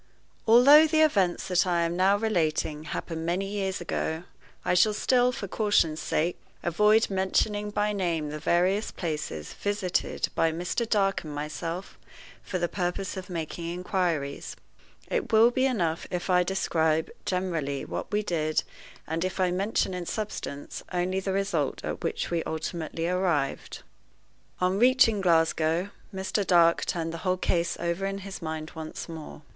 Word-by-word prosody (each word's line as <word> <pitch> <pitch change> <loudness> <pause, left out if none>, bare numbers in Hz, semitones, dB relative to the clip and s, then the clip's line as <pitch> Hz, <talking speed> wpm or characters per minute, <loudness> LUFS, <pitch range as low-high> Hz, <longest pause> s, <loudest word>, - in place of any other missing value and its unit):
ALTHOUGH 280 +7 +8
the 315 0 +3
events 195 - +2
that 180 0 +2
I 170 -1 +2
am 170 +1 -1
now 190 +3 +4
relating 160 -7 0
happened 165 0 -4
many 175 +4 0
years 195 -1 -2
ago, 165 -1 -2 0.4
I - - +2
shall 205 +4 +4
still, 250 +2 +3
for 210 -5 -5
caution's 180 -7 +2
sake, 170 +3 -1 0.2
avoid 210 +6 +3
mentioning 205 +2 0
by 210 0 0
name 170 -6 -1
the 150 - -5
various 185 +7 +2
places 150 - -4
visited 205 -3 -1
by 165 - +2
Mr. 180 +8 -2
Dark 195 -2 +2
and 150 -2 -7
myself 165 +5 -5 0.4
for 185 - -3
the 175 -1 0
purpose 180 +2 -3
of 190 -1 -7
making 165 -1 -4
inquiries. 175 -5 -2 0.5
It - - -2
will 225 +2 +6
be 260 +2 +2
enough 170 -10 -1
if 180 +1 -2
I 180 0 +5
describe 160 -4 +1
generally 165 -7 -2
what - - -5
we 210 0 +1
did, 155 -5 0 0.4
and 160 +2 -2
if 185 +1 -3
I 185 -1 +2
mention 190 +1 0
in 180 -2 -5
substance 210 -9 -5
only 180 +1 0
the 190 0 -2
result 190 -7 -1
at - - -4
which - - -2
we 170 -1 +1
ultimately 160 +1 -3
arrived. 175 -6 -1 0.8
On 185 +2 +1
reaching 245 -4 +5
Glasgow, 165 +1 +2 0.2
Mr. 190 +1 -1
Dark 170 -3 +4
turned 165 -1 -2
the 165 - -5
whole 185 +2 0
case 170 -1 0
over 170 +3 -1
in 195 0 -3
his 195 -1 -7
mind 160 -1 -5
once 160 -1 -7
more. 160 -2 -9
180 Hz, 155 wpm, -27 LUFS, 165-200 Hz, 0.8 s, ALTHOUGH